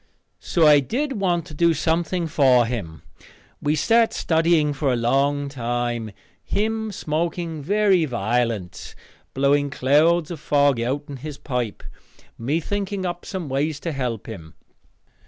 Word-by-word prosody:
So 165 -3 +1
I 150 -1 +7
did 265 - -2
want 175 -4 +1
to - - -11
do 170 +2 +3
something 170 +3 0
for 130 -6 +4
him. 100 -10 -5 0.6
We 150 +1 +1
sat 225 +8 +3
studying 160 -2 +2
for 140 -1 0
a - - +2
long 140 +4 +1
time, 120 -3 -3 0.3
him 220 +1 -1
smoking 165 -1 -3
very 195 +1 +2
violent, 115 -5 -2 0.4
blowing 140 +1 +2
clouds 155 +5 +2
of 165 - -6
fog 145 -3 +2
outen 140 +3 -3
his 145 +2 -7
pipe, 125 -7 -4 0.5
me 140 +8 -1
thinking 200 +2 -3
up 175 0 -4
some 185 -6 -4
way 140 +4 0
to 150 +4 -5
help 125 -7 -3
him. 85 -9 -10
145 Hz, 135 wpm, -23 LUFS, 125-170 Hz, 0.6 s, I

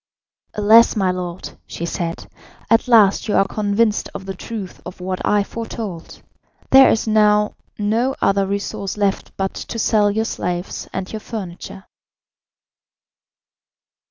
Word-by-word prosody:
"Alas, 220 +3 +6
my 190 -3 +1
lord," 180 -1 -5 0.2
she 170 - -5
said, 170 -1 -4 0.5
"at 230 +3 +4
last 220 -5 +4
you 210 - 0
are 195 - +4
convinced 210 +1 0
of 190 - -6
the 195 - -4
truth 195 0 -7
of 180 - -9
what 185 0 -4
I 205 -1 +2
foretold. 220 -5 -7 0.5
There 265 0 +8
is 225 - 0
now 210 -1 +3 0.2
no 230 +6 0
other 195 0 +2
resource 200 0 -3
left 200 -2 -1
but 195 0 -2
to - - -6
sell 215 -2 +3
your 220 +2 0
slaves 180 -3 -4
and 190 +2 -5
your 220 - -3
furniture." 190 -3 -8
205 Hz, 135 wpm, -20 LUFS, 190-220 Hz, 0.5 s, There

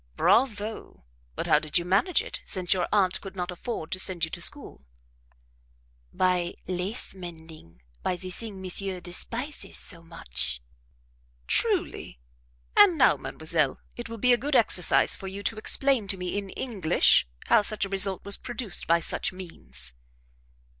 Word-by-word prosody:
"Bravo! 220 - 0 0.3
but - - -3
how - - +4
did 155 +1 0
you 175 - -1
manage 225 - +2
it, - - -7
since 180 -2 +2
your 185 - -1
aunt 190 -3 +2
could 195 -1 -9
not 180 -1 -3
afford 180 -2 -5
to 185 - -1
send 180 -3 +2
you 165 - -12
to 175 - -6
school?" 285 - -1 1.3
"By 180 - 0
lace 185 +6 -3
mending; 160 - -12 0.2
by 185 - -1
the 185 +1 -5
thing 205 0 -5
monsieur 185 0 -2
despises 230 - -4
so 170 -4 -4
much." 65 - -4 0.9
"Truly! - - 0 0.6
And 395 -5 +7
now, - - +5
mademoiselle, - - 0 0.2
it 240 -1 -7
will 230 - -6
be 250 +3 +4
a - - +4
good 285 +1 -1
exercise 215 -7 +5
for 195 - -8
you 195 +2 -6
to 225 - -1
explain 260 0 +2
to 195 - 0
me 180 0 -4
in 200 -1 -3
English 195 - +2 0.2
how - - +5
such 210 0 0
a - - -8
result 195 -1 0
was 200 0 0
produced 235 -6 -4
by 170 +1 +4
such - - 0
means." 65 - -9
190 Hz, 160 wpm, -27 LUFS, 175-220 Hz, 1.3 s, And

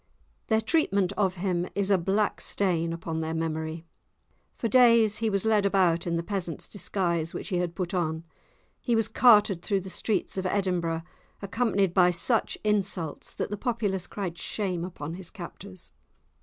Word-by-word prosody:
Their 220 0 +3
treatment 200 - +1
of 190 -3 +1
him 180 -1 -1
is 200 0 0
a 195 - +6
black 195 +4 0
stain 170 -4 0
upon 165 -1 -4
their 160 0 -2
memory. 160 0 -3 0.7
For 230 - -1
days 230 -3 +5
he 225 -1 0
was 195 0 0
led 215 -2 +3
about 180 -4 +2
in 170 - 0
the 170 - -1
peasant's 175 -4 -4
disguise, 170 -5 -2
which - - -5
he 185 - 0
had 175 -1 -2
put 180 0 -3
on; 160 -3 -1 0.6
he 240 - 0
was 225 -1 +2
carted 210 -7 +5
through 195 +1 0
the 190 0 -8
streets 200 -2 -1
of 185 - -1
Edinburgh, 180 -4 0 0.4
accompanied 200 -3 +1
by 180 -2 +5
such 215 +6 0
insults 200 -7 -2
that - - -3
the 210 - -2
populace 205 -6 -1
cried 180 -4 -5
shame 185 -3 -2
upon 165 -3 -6
his 180 -1 -9
captors. 185 -1 -10
190 Hz, 170 wpm, -27 LUFS, 170-205 Hz, 0.7 s, a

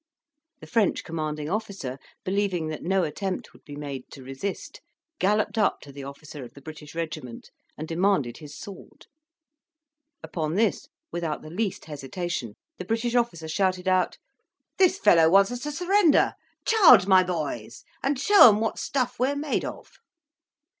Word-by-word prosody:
The - - -9
French 225 -5 +1
commanding 155 -2 -4
officer, 190 - -4 0.3
believing 185 -4 0
that 155 - -5
no 190 +1 +1
attempt 185 +4 -4
would - - -20
be 145 - -10
made 140 -3 -7
to 135 - -11
resist, 135 +10 -6 0.4
galloped 210 +3 +1
up 210 - +2
to 140 - -12
the 140 0 -9
officer 140 +1 -9
of 120 - -12
the 140 - -13
British 155 0 -10
regiment, 155 -8 -6 0.3
and 155 - -6
demanded 165 -8 +1
his 150 -2 -11
sword. 200 -2 -11 1.2
Upon 160 -1 -3
this, 225 +6 +1 0.2
without 165 -3 -3
the 155 - -10
least 200 +2 -3
hesitation, 145 - -5 0.2
the - - -5
British 230 +1 -1
officer 235 -10 0
shouted 185 +2 0
out, 185 -1 +2 0.6
"This 375 0 +4
fellow 165 - +5
wants 195 +5 +5
us 245 - -4
to 295 +3 -4
surrender: 355 0 +3 0.3
charge, 325 - +7
my 190 -1 +6
boys! 155 -11 -4 0.2
and 275 +1 0
show 400 +2 +8
them 210 -2 +4
what 225 0 -2
stuff 250 -2 -2
we 255 - +3
are 285 - -1
made 290 0 -1
of." - - -7
185 Hz, 160 wpm, -26 LUFS, 150-225 Hz, 1.2 s, show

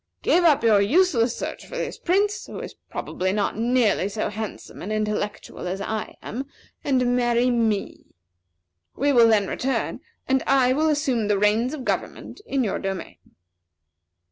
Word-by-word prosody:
Give 355 - +3
up 310 -7 +4
your 215 -3 +5
useless 245 - +3
search - - -6
for - - -7
this - - -4
Prince, 405 +3 0
who - - -7
is - - -7 0.2
probably 185 +1 -2
not 205 0 -1
nearly 230 -3 +2
so 215 +1 -2
handsome 215 0 -7
and 205 - -5
intellectual 210 -3 -3
as 185 +2 -3
I 215 +2 -4
am, 265 +5 -5 0.4
and 250 -3 +2
marry 240 0 +2
me. 225 -4 -1 0.9
We 285 +2 +2
will 235 -2 +7
then 215 -3 +4
return, 265 +6 -2 0.3
and 265 0 +2
I 255 -2 +4
will 310 +3 +2
assume 270 -8 0
the 205 -1 +2
reins 220 +7 +2
of 265 -4 -8
government - - -3
in 270 -1 0
your 210 - -1
domain." 195 -2 -5
235 Hz, 160 wpm, -24 LUFS, 210-270 Hz, 0.9 s, will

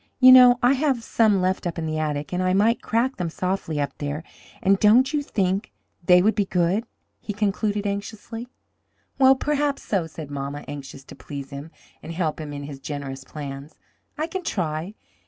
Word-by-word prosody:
You 255 0 +9
know 250 -1 +9
I 245 +2 +6
have 270 -4 0
some 215 -4 +3
left 185 0 0
up 170 - -4
in 165 - -3
the 155 0 -2
attic, 150 0 -3
and 180 - 0
I 185 0 +1
might 225 +4 +3
crack 240 +4 0
them 175 -3 -2
softly 180 -3 -2
up 145 - -2
there, 145 +2 -4 0.4
and 195 +1 +3
don't 250 +7 +5
you 295 - +1
think 195 -5 -1 0.3
they 180 +1 +6
would 215 +2 +4
be 205 -1 0
good?" 185 +5 +1 0.3
he 210 - -5
concluded 205 0 -1
anxiously. 215 +3 -5 0.7
"Well, 265 0 +7
perhaps 290 0 -1
so," 185 -6 -1
said 155 -2 -9
mamma, 140 +1 -5
anxious 140 -1 -8
to - - -13
please 140 -2 -8
him 140 +3 -7 0.3
and 165 - -7
help 165 -2 -2
him 150 -1 -6
in 145 0 -6
his 140 -1 -8
generous 135 -2 -6
plans. 140 0 -8 0.4
"I 310 - 0
can 370 +3 -4
try. 175 - -3
185 Hz, 190 wpm, -24 LUFS, 150-225 Hz, 0.7 s, You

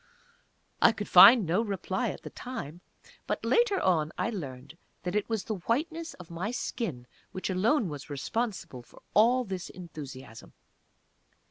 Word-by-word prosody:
I 230 - +6
could 205 - -5
find 215 +4 +9
no 175 +6 +1
reply 200 -4 -2
at - - -7
the - - -8
time, 180 - -7 0.5
but - - -2
later 470 -4 +3
on 160 -5 +1
I 235 - -1
learned 140 - -7 0.3
that 180 - -3
it 210 +1 0
was 225 -3 -1
the 215 -3 -4
whiteness 320 +7 -1
of 175 -2 -13
my 175 +5 -3
skin 225 - -4 0.3
which 185 +1 -3
alone 215 +6 +2
was 145 -2 -7
responsible 175 - -3
for - - -19
all 245 +4 +4
this 190 -5 -5
enthusiasm. 140 -9 -10
190 Hz, 150 wpm, -29 LUFS, 155-235 Hz, 0.5 s, find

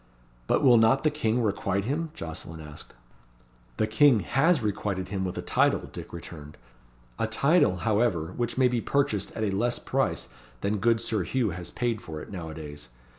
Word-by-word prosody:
"But - - +2
will 125 -3 +7
not 115 +5 +4
the 155 - +3
King 120 -5 0
requite 100 -2 0
him?" 155 +6 -1
Jocelyn 80 - -7
asked. 75 -4 -10 0.8
"The - - +2
King 110 +2 +5
has 150 - +3
requited 100 -3 -2
him 95 -1 -2
with 90 -1 -3
a - - -3
title," - - +2
Dick - - -8
returned. 75 -3 -9 0.6
"A 110 - +1
title, 140 - +3
however, 105 -7 +1
which 120 0 -2
may 130 -1 +5
be 120 -2 0
purchased 125 -9 0
at 110 - -3
a 105 - +1
less 120 +5 0
price - - -1 0.3
than 105 +1 0
good 115 +2 +2
Sir 110 -3 -1
Hugh 110 +5 0
has 85 +1 -7
paid 120 -3 -2
for 80 -2 -7
it, - - -10
now 85 -5 -6
a 80 - -8
days. 75 -5 -9
110 Hz, 185 wpm, -27 LUFS, 90-120 Hz, 0.8 s, will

